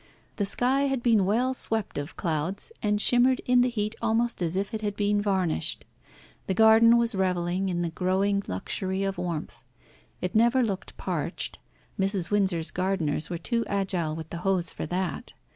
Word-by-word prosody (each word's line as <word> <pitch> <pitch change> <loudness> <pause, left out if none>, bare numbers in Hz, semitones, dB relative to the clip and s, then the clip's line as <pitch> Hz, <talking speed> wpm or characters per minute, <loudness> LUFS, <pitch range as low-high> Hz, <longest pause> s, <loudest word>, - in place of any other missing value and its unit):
The 205 - 0
sky 260 +6 +2
had 270 -3 -1
been 225 -5 +4
well 240 +6 +1
swept 225 - -1
of 145 +3 -7
clouds, 170 - -2
and 210 -1 +1
shimmered 245 +3 +4
in 250 0 +4
the 250 - +3
heat 215 -2 -2
almost 230 -1 0
as 170 0 0
if 200 +4 -2
it 220 - -3
had 205 -1 -2
been 205 0 +1
varnished. 190 - -1 0.6
The 190 - 0
garden 225 +2 +7
was 235 0 +1
revelling 185 0 0
in 175 -1 -1
the 170 - -2
growing 195 +3 +1
luxury 190 - -2
of 195 -2 -2
warmth. 170 -3 -4 0.6
It 180 -1 -3
never 235 +3 +4
looked 200 -5 -4
parched; - - -3 0.4
Mrs. 195 -2 0
Windsor's 190 -5 +1
gardeners 180 -5 -1
were 175 - -3
too 230 +6 -1
agile 190 -6 -1
with 160 0 -8
the 170 - -4
hose 180 0 0
for - - -5
that. 180 +1 -3
195 Hz, 175 wpm, -27 LUFS, 175-225 Hz, 0.6 s, garden